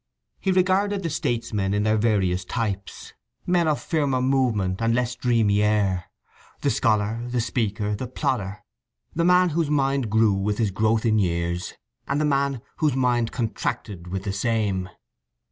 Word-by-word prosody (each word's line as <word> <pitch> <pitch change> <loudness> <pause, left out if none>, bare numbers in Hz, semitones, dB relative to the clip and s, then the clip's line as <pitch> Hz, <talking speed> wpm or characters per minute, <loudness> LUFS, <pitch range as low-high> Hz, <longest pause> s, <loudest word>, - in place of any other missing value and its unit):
He 195 - 0
regarded 190 +2 +2
the 165 - -2
statesmen 115 - -1
in 105 - +1
their 110 0 +2
various 100 -5 +1
types, 100 -1 -4 0.3
men 175 -2 +2
of 150 -2 +1
firmer 145 -5 0
movement 120 -8 +1
and 115 0 +2
less 125 0 0
dreamy 115 -5 +2
air; 100 -4 +1 0.6
the - - +2
scholar, 110 +1 +1
the 120 0 -1
speaker, 105 -3 -1
the 125 +5 -5
plodder; 100 -2 -2 0.5
the 170 - 0
man 180 0 +5
whose 160 -1 0
mind 135 -4 +1
grew 110 -1 +3
with 100 +2 -1
his 110 -4 +1
growth 110 +3 +1
in 110 -1 +3
years, 85 -1 -1 0.3
and 140 +1 0
the 155 - +1
man 140 -3 0
whose 150 -5 +1
mind 120 -3 +1
contracted 105 -5 -3
with 95 +1 -4
the 100 - -3
same. 100 -3 -1
115 Hz, 160 wpm, -24 LUFS, 100-135 Hz, 0.6 s, man